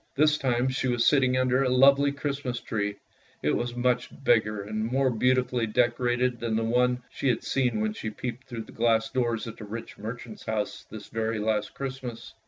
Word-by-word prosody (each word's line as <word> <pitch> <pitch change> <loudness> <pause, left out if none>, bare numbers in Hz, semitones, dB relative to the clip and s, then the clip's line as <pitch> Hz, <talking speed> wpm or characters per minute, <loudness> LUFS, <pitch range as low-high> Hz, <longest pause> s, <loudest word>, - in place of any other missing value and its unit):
This 150 +1 +4
time 125 -1 +1
she 130 0 -1
was 120 -2 +2
sitting 130 -3 +4
under 130 0 +2
a 135 - +2
lovely 140 +2 +5
Christmas 140 -3 -3
tree. 105 -2 -2 0.5
It 75 - +2
was 120 0 -2
much 125 0 +1
bigger 105 -4 +2
and 110 +1 -3
more 135 0 +2
beauti 125 +2 +2
fully 120 -2 -1
decorated 120 +2 +1
than 115 -2 -1
the 115 - +1
one 125 +2 +2
she - - -2
had 120 - 0
seen 125 -5 0
when 110 0 0
she 110 - -4
peeped 125 +3 -6
through 120 -3 -5
the - - -14
glass 115 -1 +1
doors 120 -4 0
at 115 - -7
the - - -9
rich 115 +3 -7
merchant's 110 +1 -7
house 110 -2 -3
this 110 -1 -9
very 110 0 -1
last 105 0 -1
Christmas. 130 -3 -6
120 Hz, 195 wpm, -27 LUFS, 110-130 Hz, 0.5 s, lovely